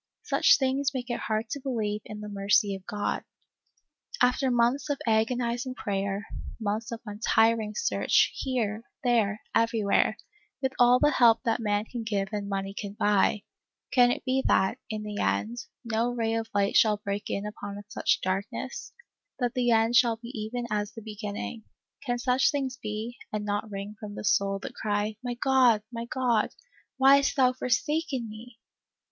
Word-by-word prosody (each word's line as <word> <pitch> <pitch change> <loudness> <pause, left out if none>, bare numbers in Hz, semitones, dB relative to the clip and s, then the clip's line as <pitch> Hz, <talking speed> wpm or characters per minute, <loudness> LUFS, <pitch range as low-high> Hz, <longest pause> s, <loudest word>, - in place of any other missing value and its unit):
Such 445 - +5
things 270 +1 0
make 250 -1 -3
it 240 - -2
hard 220 0 -2
to 285 - -2
believe 220 -6 -2
in 210 0 -8
the 210 - -6
mercy 200 0 +2
of 190 -1 -8
God. 205 0 -2 1.0
After 260 +2 +3
months 245 +4 +2
of 285 - 0
agonizing 240 +3 0
prayer, 200 0 -2 0.3
months 220 +1 -2
of 230 -1 -5
untiring 220 0 +2
search, 465 - +2
here, 230 -5 -2 0.2
there, 220 -4 +2
everywhere, 225 -3 +2 0.4
with 265 -1 0
all 245 0 +7
the 295 +2 +4
help 235 -3 +5
that 230 -1 +1
man 210 -1 0
can 240 +1 -6
give 200 -3 -1
and 205 -2 -3
money 195 0 -3
can 200 0 -6
buy, 205 0 +2 0.5
can 245 -2 +6
it - - -4
be 265 0 +1
that, 190 +6 +2
in 215 -1 -4
the 210 -1 -5
end, 235 +3 0 0.3
no 230 +1 0
ray 230 -2 -1
of 225 0 -2
light 200 -1 +1
shall 215 -2 +5
break 205 0 -4
in 200 - -2
upon 205 -1 -6
such - - +1
darkness; 200 - -3 0.5
that 245 -2 -1
the 250 -2 +1
end 225 +1 +3
shall 235 -2 +5
be 235 +1 -11
even 235 +1 -4
as 210 0 -1
the 225 - -8
beginning; 210 +1 -6 0.4
can 245 -3 -1
such 250 +1 +2
things 270 -4 -2
be, 220 0 -5
and 210 -1 -3
not 205 +1 -2
wring 200 +1 -6
from 205 -1 -7
the - - -6
soul 195 +3 +2
the - - -7
cry, 210 0 -1
" - - -52
My 245 -1 -3
God 250 -4 +4
— - - -60
my 230 0 -4
God, 240 -3 +1 0.5
why 270 +1 +7
hast 280 - +1
thou 255 -2 +4
forsaken 260 +1 -1
me 220 +2 -11
225 Hz, 175 wpm, -28 LUFS, 210-245 Hz, 1.0 s, all